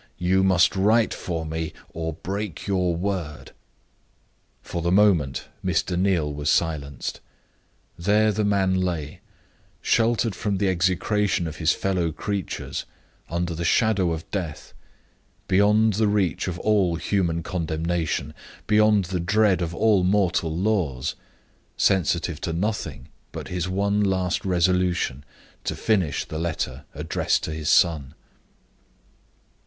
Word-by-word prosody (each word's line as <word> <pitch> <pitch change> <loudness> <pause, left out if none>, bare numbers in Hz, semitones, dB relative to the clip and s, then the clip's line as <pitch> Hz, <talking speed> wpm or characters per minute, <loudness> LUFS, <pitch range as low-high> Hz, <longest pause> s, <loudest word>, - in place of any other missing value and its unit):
"You 95 +2 +2
must 90 -2 +4
write 110 +4 +3
for 85 -2 -4
me, 80 0 -4 0.2
or 80 0 -3
break 95 +2 -5
your 90 -3 +1
word." 85 -4 -4 1.1
For 85 - -4
the 85 +1 0
moment, 90 -10 +3 0.2
Mr. 90 0 0
Neal 90 -5 +1
was 75 0 -2
silenced. 75 -4 -1 0.8
There 105 +4 +3
the 105 +1 -1
man 100 -2 +2
lay 90 -5 -2 0.6
sheltered 115 -1 +2
from 100 +1 -2
the 100 0 +1
execration 95 +1 +1
of 80 -1 -6
his 80 -1 +2
fellow 90 -4 -1
creatures, 100 +4 -4 0.4
under 85 +1 -2
the 85 +1 -4
shadow 100 0 +2
of 80 -1 -5
Death 85 -7 -5 0.7
beyond 105 +3 +4
the 105 +2 +2
reach 100 -5 0
of 90 -2 -3
all 100 -5 +2
human 85 -2 0
condemnation, 80 -3 -2 0.3
beyond 105 -2 +4
the 90 +1 -3
dread 100 +2 +2
of 85 0 -3
all 105 -3 +3
mortal 90 -4 +1
laws; 85 - 0 0.6
sensitive 85 -3 +1
to 85 - -2
nothing 80 - -3 0.2
but - - -7
his 90 0 -2
one 100 +2 +1
last 95 -2 0
resolution 90 -6 +1 0.4
to - - -2
finish 95 -10 0
the 80 - -6
letter 75 -5 -3
addressed 75 +2 0
to - - -3
his 75 -1 -3
son. 75 -4 +3
90 Hz, 125 wpm, -24 LUFS, 80-100 Hz, 1.1 s, must